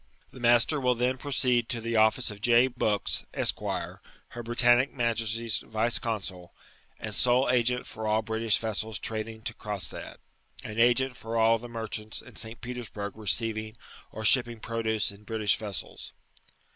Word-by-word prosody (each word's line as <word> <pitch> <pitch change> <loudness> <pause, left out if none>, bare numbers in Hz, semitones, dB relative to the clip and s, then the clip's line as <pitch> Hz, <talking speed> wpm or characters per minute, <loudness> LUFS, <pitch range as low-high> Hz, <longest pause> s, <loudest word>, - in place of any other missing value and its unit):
Ihe 130 - -11
master 120 +5 +4
wiH 125 -2 +1
then 125 +2 0
proceed 125 -4 +2
to 120 - 0
the 115 0 -3
office 110 +3 +3
of 105 0 -11
J. 120 +2 +5
Bookbb, 110 -5 0
£s(}.. - - -2 0.3
Her 120 - -7
Britannic 120 +3 +3
'Majesty's 115 -2 0
Yioe 110 +2 -1
Consu], 95 -6 -4 0.5
and - - -6
sole 125 +2 +3
agent 125 0 +2
for 110 0 -6
all 110 +1 +2
British 110 -1 +1
vessels 110 0 -2
tradm^ 110 0 -3
to - - -3
Cronstadt, 105 -3 -5 0.5
and 110 0 -6
i^nt 125 +2 +3
for 115 +1 -4
all 115 0 +4
the 120 +2 -9
merchants 110 -2 -3
in - - -12
St^ 115 +1 -3
Petersburg 115 -5 -6
receiving 110 +2 -1 0.3
or 110 0 -6
shipping 120 0 +5
produce 110 -2 -1
in 100 +1 -15
Britifi£ 110 -2 +1
vessels. 105 -3 -6
115 Hz, 155 wpm, -28 LUFS, 110-120 Hz, 0.5 s, J